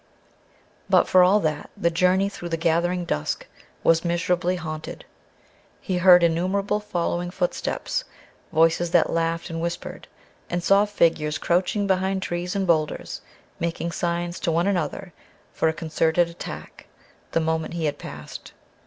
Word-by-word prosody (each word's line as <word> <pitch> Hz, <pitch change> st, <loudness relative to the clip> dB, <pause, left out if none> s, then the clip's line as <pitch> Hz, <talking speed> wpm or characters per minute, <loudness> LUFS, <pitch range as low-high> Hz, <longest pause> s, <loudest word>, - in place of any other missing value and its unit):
But -, -, +5 dB
for 185 Hz, -, +6 dB
all 190 Hz, +4 st, +5 dB
that 155 Hz, -3 st, -2 dB
the 170 Hz, -, +1 dB
journey 185 Hz, +3 st, +3 dB
through 175 Hz, -3 st, -7 dB
the 165 Hz, -, -1 dB
gathering 175 Hz, +2 st, +1 dB
dusk 75 Hz, -, -2 dB, 0.4 s
was 165 Hz, 0 st, +4 dB
miserably 175 Hz, +1 st, 0 dB
haunted. 155 Hz, -3 st, -6 dB, 0.7 s
He 185 Hz, -3 st, -2 dB
heard 180 Hz, -1 st, +7 dB
innumerable 185 Hz, +5 st, +1 dB
following 175 Hz, -3 st, -2 dB
footsteps; -, -, -2 dB, 0.5 s
voices 165 Hz, +2 st, +3 dB
that 170 Hz, -1 st, +3 dB
laughed 165 Hz, +1 st, -1 dB
and 165 Hz, 0 st, -4 dB
whispered; 170 Hz, 0 st, -5 dB, 0.4 s
and 175 Hz, 0 st, -2 dB
saw 200 Hz, +3 st, +5 dB
figures 165 Hz, -6 st, +1 dB
crouching 185 Hz, +5 st, +1 dB
behind 190 Hz, 0 st, 0 dB
trees 175 Hz, +1 st, -3 dB
and 195 Hz, -1 st, 0 dB
boulders, 155 Hz, -4 st, 0 dB, 0.4 s
making 170 Hz, 0 st, -2 dB
signs 175 Hz, 0 st, -2 dB
to 170 Hz, -, 0 dB
one 170 Hz, +2 st, +1 dB
another 180 Hz, -1 st, -2 dB, 0.4 s
for -, -, +1 dB
a -, -, -1 dB
concerted 165 Hz, +1 st, +1 dB
attack 170 Hz, -, -9 dB, 0.5 s
the -, -, +3 dB
moment 160 Hz, 0 st, -1 dB
he 165 Hz, -2 st, -1 dB
had 145 Hz, -, -2 dB
passed. -, -, -9 dB
170 Hz, 145 wpm, -24 LUFS, 165-185 Hz, 0.7 s, heard